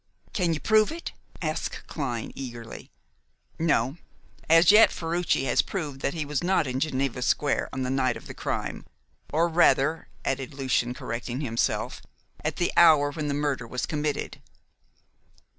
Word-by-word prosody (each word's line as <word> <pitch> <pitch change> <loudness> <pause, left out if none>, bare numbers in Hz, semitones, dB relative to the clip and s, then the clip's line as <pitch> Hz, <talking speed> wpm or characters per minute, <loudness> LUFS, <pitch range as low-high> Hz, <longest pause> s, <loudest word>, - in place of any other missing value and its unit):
"Can 175 -4 +1
you - - -4
prove 215 - +3
it?" 335 +1 -6 0.3
asked 155 +1 -3
Clyne 125 -7 -4
eagerly. 120 -4 -8 0.7
"No. 150 -3 +1 0.5
As 165 +3 +7
yet, 215 +2 +7
Ferruci 170 -3 0
has 130 - +3
proved 150 -8 -5
that 140 - -1
he 155 -2 -2
was 145 -1 -2
not 180 -3 +2
in 130 0 -2
Geneva 135 -4 -1
Square 145 +3 +1
on 130 - -3
the 125 - -2
night 130 -2 +1
of - - -13
the - - -8
crime - - -4 0.5
or 165 +3 +3
rather," 160 -2 +3 0.2
added 135 +1 -2
Lucian, 125 -2 0
correcting 120 +3 -4
himself, 115 -5 -1 0.4
"at 150 0 -1
the 175 - 0
hour 155 -4 +6
when 155 -1 -4
the 140 - -1
murder 145 -5 -1
was 125 +1 -3
committed." 150 -1 -3
145 Hz, 155 wpm, -26 LUFS, 130-165 Hz, 0.7 s, As